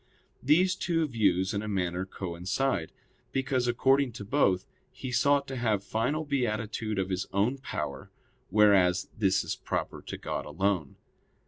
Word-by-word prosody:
These 175 +7 +4
two 165 -3 0
views 100 -6 +1
in 100 - -1
a 110 - -5
manner 90 -2 -1
coincide; 95 +3 -2 0.4
because 130 -2 0
according 135 +2 +3
to 105 -3 -7
both, 95 -7 +2 0.3
he 130 0 -6
sought 140 +3 +3
to 135 - -4
have 110 -5 0
final 145 +10 -1
beatitude 110 -5 -1
of 95 0 -1
his 95 +1 -2
own 110 +8 +1
power, 75 - -5 0.4
whereas 95 -3 +4
this 95 -3 +2
is - - -3
proper - - -3
to - - -7
God - - -4
alone. 90 -2 -1
105 Hz, 145 wpm, -29 LUFS, 95-135 Hz, 0.4 s, These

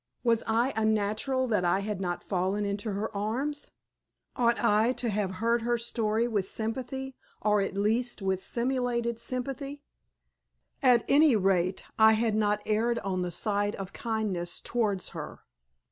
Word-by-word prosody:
Was 230 -2 +3
I 235 +4 +2
unnatural 220 +4 +1
that 210 -5 +2
I 175 +3 +2
had 205 -1 -3
not 175 -2 -2
fallen 190 +2 -1
into 200 +1 -2
her 210 +2 -3
arms? 255 +9 -2 0.7
Ought 235 -1 +2
I 225 +2 +4
to 245 -2 -2
have 200 -2 -1
heard 230 +4 +1
her 240 +1 +1
story 230 -1 0
with 205 -5 -1
sympathy, 260 +5 -4 0.3
or 210 -1 +3
at 195 - -2
least, 225 +5 0
with 190 -2 -1
simulated 235 -1 -1
sympathy? 275 +4 -4 1.0
At 250 -3 +5
any 290 -2 +5
rate 185 -2 +1 0.2
I 220 0 +8
had 220 0 +1
not 210 -1 +1
erred 230 +3 +1
on 185 -2 -1
the 180 - -1
side 205 +3 -1
of 195 -1 -7
kindness 210 -7 -2
towards 210 -6 -1
her! - - -8
220 Hz, 150 wpm, -29 LUFS, 200-240 Hz, 1.0 s, I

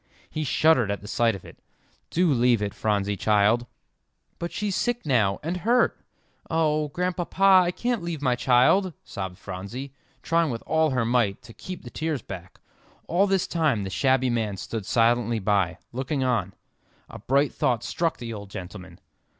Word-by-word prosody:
He 155 - -2
shuddered 150 -6 +3
at 100 - -2
the 105 - -10
sight 115 0 +1
of 95 - -11
it. - - -14 0.5
"Do 175 -3 +2
leave 120 -2 +3
it, 100 -1 -3
Phronsie, 105 -2 0
child." 110 +4 +2 0.7
"But 170 0 -4
she's 205 -2 -2
sick 240 -3 -1
now 110 -9 +2
and 170 +4 -2
hurt; 235 +7 +1 0.5
oh, 155 -2 +1
Grandpapa, 180 +3 +3
I - - +1
can't 235 +5 -1
leave 170 -2 -4
my 130 -3 +1
child," 130 +10 +3
sobbed 95 -3 -6
Phronsie, 100 +9 -7 0.3
trying 165 -1 +2
with 115 -3 -4
all 160 0 +2
her 125 -4 0
might 115 -4 +1
to 115 - -13
keep 185 +7 -8
the 120 - -10
tears 155 -6 -3
back. 90 -2 -9 0.5
All 190 +4 +2
this 195 -2 +1
time 150 -11 0
the 95 - -5
shabby 130 +7 +2
man 110 -4 -1
stood 110 +1 -5
silently 115 0 +2
by, 100 -3 +1 0.2
looking 130 +2 -2
on. 110 -7 0 0.5
A - - -10
bright 140 +2 +1
thought 120 -3 0
struck 165 -1 -1
the 115 -1 -6
old 100 -2 -8
gentleman. 95 0 -9
125 Hz, 170 wpm, -25 LUFS, 105-160 Hz, 0.7 s, shuddered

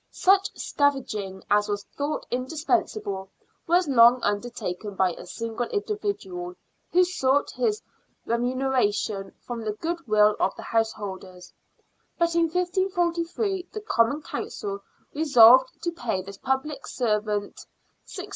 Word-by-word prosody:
Such 390 +1 +3
scavenging 215 -10 -1
as 205 0 +3
was 205 -1 -2
thought 285 +2 -2
indispensable 255 - -1 0.4
was 350 0 +3
long 245 -2 +6
under 205 +4 0
taken 200 -2 -5
by 185 -1 +2
a - - -11
single 230 +1 -4
individual, 400 - -3 0.4
who 360 +2 +5
sought 285 -6 +1
his 435 -2 -1 0.4
remuneration 235 -5 0
from 240 -2 -5
the 215 -1 -2
goodwill 215 -8 +2
of 190 - +1
the - - -9
householders; 190 -5 -3 0.6
but 335 0 +1
in 335 0 +3
1543 360 +1 -1
the 430 - -6
Common 285 - +1
Council 400 +4 -5 0.3
resolved 260 -4 +7
to 345 - 0
pay 235 - -3
this 195 +1 -10
public 265 +3 -2
servant 210 -3 -2 0.5
is. - - -4
255 Hz, 120 wpm, -25 LUFS, 210-340 Hz, 0.6 s, resolved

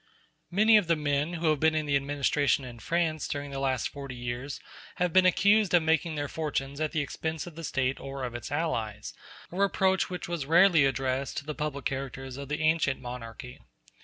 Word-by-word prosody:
Many 215 +4 +5
of 205 -5 +1
the 165 - +3
men 150 +2 0
who 165 -2 +1
have 150 - 0
been 160 +1 +3
in 155 -1 0
the 145 -1 +1
administration 140 0 +1
in 120 -2 -9
France 165 +1 -1
during 145 -1 -4
the 135 - -4
last 130 -3 0
forty 140 -3 -8
years 120 +3 -5 0.4
have 180 -2 0
been 185 -1 +6
accused 200 +1 +4
of 170 - +4
making 160 0 +1
their 145 -1 -2
fortunes 140 -2 -3
at 155 - 0
the 155 - 0
expense 160 +2 -4
of 175 - -9
the 165 +2 -9
State 135 -3 -1
or 135 -1 -6
of 125 -2 -4
its 120 +2 -6
allies; 115 -10 -2 0.4
a 175 - -7
reproach 190 -1 +2
which 180 -1 -5
was 170 -5 -3
rarely 170 -2 +6
addressed 135 0 -1
to 140 - -4
the 150 - -4
public 150 -3 -4
characters 135 -1 -4
of 140 0 -7
the 150 +1 -2
ancient 155 -4 +2
monarchy. 125 0 -8
145 Hz, 205 wpm, -28 LUFS, 135-165 Hz, 0.4 s, been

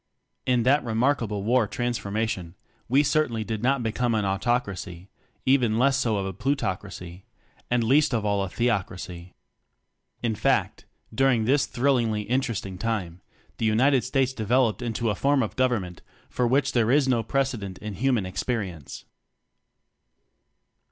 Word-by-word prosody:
In 125 -2 +3
that 140 +4 +3
remarkable 115 -3 0
war 115 0 +2
transfor 120 -2 -3
mation, 100 -5 -2 0.3
we 135 +4 +4
certainly 145 -7 +1
did 110 -1 -4
not 130 0 +1
become 115 +1 0
an 105 -2 0
Autocracy; 100 -3 -2 0.4
even 125 -5 +3
less 135 +3 +3
so 120 -6 +1
a 95 -1 -3
Plutoc 115 -3 -1
racy; 90 -2 -10 0.4
and 120 -1 +2
least 140 +6 +3
of 110 -4 -1
all 100 -1 +1
a 95 - -4
Theocracy. 90 -6 -3 0.9
In 115 -2 +1
fact, 105 - 0 0.3
during 130 -2 +2
this 135 +3 +2
thrillingly 120 -5 +1
interesting 115 -6 -2
time, 100 -7 -3 0.4
the 115 - 0
United 130 +4 +3
States 130 0 0
developed 120 0 +1
into 115 -1 -1
a - - 0
form 140 +5 +2
of 110 - -5
"Government" 110 -9 -1 0.3
for 125 - +1
which 135 +2 +2
there 115 -3 +2
is 140 +1 +4
no 125 -3 +2
precedent 115 -6 -2
in 105 -1 -6
human 120 -1 +1
ex 95 - -4
perience. 95 - -4
115 Hz, 145 wpm, -25 LUFS, 100-130 Hz, 0.9 s, we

